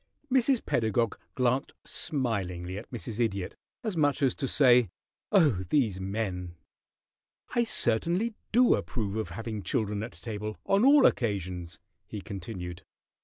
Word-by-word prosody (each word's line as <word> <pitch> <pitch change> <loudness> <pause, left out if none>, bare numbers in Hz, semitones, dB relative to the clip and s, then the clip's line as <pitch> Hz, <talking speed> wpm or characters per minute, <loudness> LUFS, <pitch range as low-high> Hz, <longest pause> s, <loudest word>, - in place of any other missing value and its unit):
Mrs. 260 -1 +3
Pedagog 115 -1 0 0.2
glanced 125 +2 +1
smilingly 95 - -2
at 110 - -12
Mrs. 115 -2 -6
Idiot, 100 -6 -1 0.3
as 215 -5 -2
much 145 -2 +2
as 130 - +4
to 135 - -3
say, 125 -6 +5 0.4
"Oh, 155 - +4
these 115 -11 +2
men!" 95 -3 -3 1.0
"I 240 -1 +2
certainly 175 - +2 0.2
do 245 +2 +5
approve 105 -6 -2
of 110 -1 -2
having 115 -2 -5
children 105 +2 -1
at 115 - -6
table 105 -2 -6
on 195 +2 +3
all 280 +2 +7
occasions," 90 -6 -1 0.3
he 105 - -6
continued. 90 -3 -7
115 Hz, 130 wpm, -29 LUFS, 100-145 Hz, 1.0 s, all